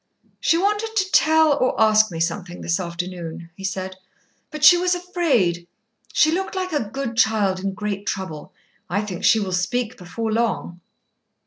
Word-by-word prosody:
"She 330 - +2
wanted 420 +4 0
to 380 -3 0
tell 315 -1 +5
or 255 - 0
ask 215 0 +5
me 165 -3 -6
something 175 +1 -3
this 170 +2 -1
afternoon," 170 -1 -6
he 195 - -11
said, 190 -1 -4 0.5
"but 305 -1 -7
she 315 +4 +9
was 360 +1 +1
afraid. 270 - 0 0.4
She 310 - +3
looked 380 +3 -2
like 370 -2 -3
a 295 - +2
good 270 -1 -4
child 215 -4 +2
in 195 0 -3
great 205 -1 -4
trouble. 185 -6 -5 0.4
I 200 +4 0
think 185 -4 -6
she 225 - +5
will 195 -3 -3
speak 225 +7 -1
before 220 +5 -4
long." 220 -6 -1
215 Hz, 165 wpm, -22 LUFS, -, 0.5 s, she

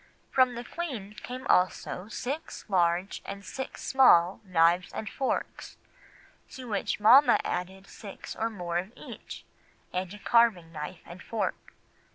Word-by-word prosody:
From 255 -2 +3
the 240 - -5
Queen 245 - -5
came 255 +4 -8
also 180 -2 +1
six 270 +8 -5
large 180 -1 +1
and 200 0 -8
six 265 +7 -6
small 195 -9 +5
knives 175 -1 +3
and 220 - -5
forks, 265 +6 -3 0.7
to 260 -2 -9
which 205 -1 -2
mamma 255 +8 +7
added 190 +2 -4
six 200 -1 -9
more 180 -6 -2
of 190 +6 -7
each, - - -10 0.5
and 180 0 -2
a 210 - -8
carving 210 -6 +3
knife 155 +2 -7
and 175 +2 -11
fork. 215 -4 -4
200 Hz, 135 wpm, -28 LUFS, 180-240 Hz, 0.7 s, mamma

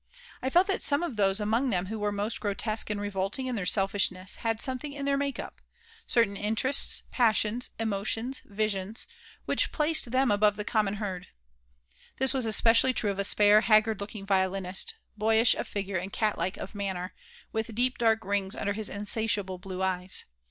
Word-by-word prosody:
I 260 - -1
felt 350 +7 +4
that 390 -1 -1
some 285 +3 +3
of 335 -9 -3
those 195 -1 +2
among 225 +5 +1
them 185 -4 0
who 220 +3 -5
were 210 0 0
most 205 +2 -2
grotesque 215 +2 -1
and 210 -1 -2
revolting 205 +4 -2
in 255 - -2
their 190 -5 -2
selfishness 195 -1 0
had 225 -1 -1
something 260 +4 -4
in 280 -1 -5
their 280 0 +2
make 280 -1 -2
up - - -8 0.5
certain 230 -4 +2
interests, 225 +7 0
passions, 230 0 +1
emotions, 225 +4 -1
visions 210 0 -2 0.4
which - - 0
placed 305 -4 +3
them 255 0 +2
above 205 0 +3
the 210 0 -5
common 210 -2 0
herd. 190 -4 -5 0.9
This 265 0 +2
was 255 -4 -1
especially 230 +3 +5
true 210 -3 +1
of 200 - -6
a - - +1
spare, 205 +1 +6
haggard 220 -1 +3
looking 200 0 -7
violinist, 190 -1 0 0.2
boyish 225 +2 +4
of - - -4
figure 200 -2 -3
and 185 +3 -4
cat 215 -2 0
like 185 - -2
of - - -7
manner, 190 -3 -4 0.4
with 220 0 -3
deep 250 +2 +1
dark 225 -3 +2
rings 195 -1 -1
under 200 - -2
his 215 +1 -4
insatiable 205 -2 -1
blue 185 0 -5
eyes. 185 0 -1
210 Hz, 180 wpm, -28 LUFS, 195-230 Hz, 0.9 s, spare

